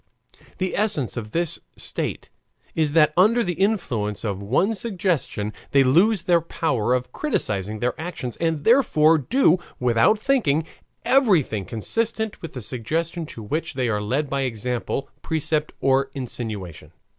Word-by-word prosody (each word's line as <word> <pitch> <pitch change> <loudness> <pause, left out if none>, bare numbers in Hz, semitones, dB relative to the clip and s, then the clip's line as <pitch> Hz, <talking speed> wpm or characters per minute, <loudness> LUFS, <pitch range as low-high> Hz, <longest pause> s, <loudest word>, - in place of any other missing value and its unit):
The 185 -1 -2
essence 200 - 0
of 110 -3 -5
this 170 +5 -1 0.2
state - - -4 0.4
is 155 -3 +1
that 155 -2 +5
under 220 +7 +4
the 180 -3 -1
influence 130 - -1
of 100 -3 -3
one 135 - +1
suggestion 180 - -2 0.2
they 140 -1 +6
lose 175 - +4
the 170 -2 +3
power 130 -8 0
of 125 0 -3
criticising 105 - -1
their 125 0 +1
actions, 160 -8 -5
and 165 -3 -1
therefore 165 - +5
do, 185 - +3 0.2
without 125 - +3
thinking, 210 - +1 0.4
everything 180 - +3
consistent 220 - -2
with 165 - -7
the 125 - -5
suggestion 160 - -3
to 115 - -9
which 155 +7 -3
they 125 -3 0
are 105 -2 0
led 135 +8 -1
by 140 0 -1
example, 125 +2 -2
precept, 155 -1 -1
or 135 0 +2
insinuation. 110 - -6
150 Hz, 145 wpm, -23 LUFS, 120-180 Hz, 0.4 s, they